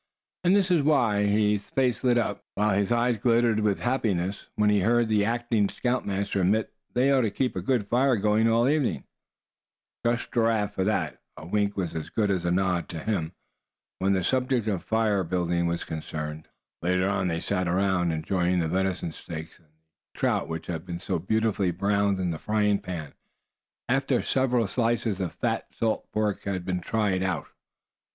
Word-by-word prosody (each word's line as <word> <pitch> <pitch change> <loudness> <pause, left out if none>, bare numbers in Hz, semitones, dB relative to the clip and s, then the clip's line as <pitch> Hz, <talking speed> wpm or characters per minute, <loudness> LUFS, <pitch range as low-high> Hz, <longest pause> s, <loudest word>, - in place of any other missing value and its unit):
And 180 +2 +4
this 190 -2 +2
was 170 -4 +4
why 125 -9 +3
his 105 -1 +1
face 125 -2 0
lighted 125 -1 +3
up, 110 -4 -1
while 105 +1 +2
his 100 +1 +1
eyes 120 -1 +2
glittered 115 -1 +3
with 105 -2 0
happiness, 100 -7 -1
when 105 0 +3
he 105 - +3
heard 115 +4 +3
the 105 -2 +3
acting 115 -2 +1
scoutmaster 100 -6 -1
admit 105 +4 +1 0.2
they 130 +3 +3
ought 135 -1 +4
to 115 - +1
keep 125 +5 -1
a 95 - -2
good 110 +1 0
fire 130 +3 +3
going 105 +2 +2
all 115 +2 +3
evening. 145 -2 +1 1.0
Trust 120 0 0
Giraffe 115 -3 +1
for 95 - -1
that; 95 -7 -1 0.2
a 75 - -9
wink 100 +3 0
was 85 -4 -2
as 80 -2 -4
good 105 -3 0
as 90 -3 -1
a 85 - +1
nod 90 -1 0
to 85 - -6
him, 95 -4 -2 0.7
when 95 +1 +2
the 95 -2 +1
subject 125 +1 +1
of 95 -5 -1
fire 110 -3 +1
building 85 0 0
was 85 0 -2
concerned. 75 0 -6 0.3
Later 90 +2 +1
on, 95 -2 0
they 85 -1 -1
sat 95 0 -1
around 90 -1 +1
enjoying 90 +3 0
the 85 -2 +1
venison 95 -1 -1
steaks, 80 0 -8
and 80 - -29
the 80 +1 -25
trout - - +1
which 80 0 -4
had 80 -2 -4
been 85 -2 -6
so 90 -1 -2
beautifully 105 +1 +1
browned 100 +2 +1
in 90 -2 0
the 80 - -5
frying 105 -1 +1
pan, 80 -6 -6 0.7
after 135 +2 +1
several 125 -3 +1
slices 115 -1 0
of 90 -3 -3
fat - - -2
salt 110 -1 -2
pork 105 -2 -1
had 95 -3 -3
been 90 -1 -2
"tried 100 -1 0
out." 90 -5 -1
100 Hz, 185 wpm, -26 LUFS, 90-115 Hz, 1.0 s, And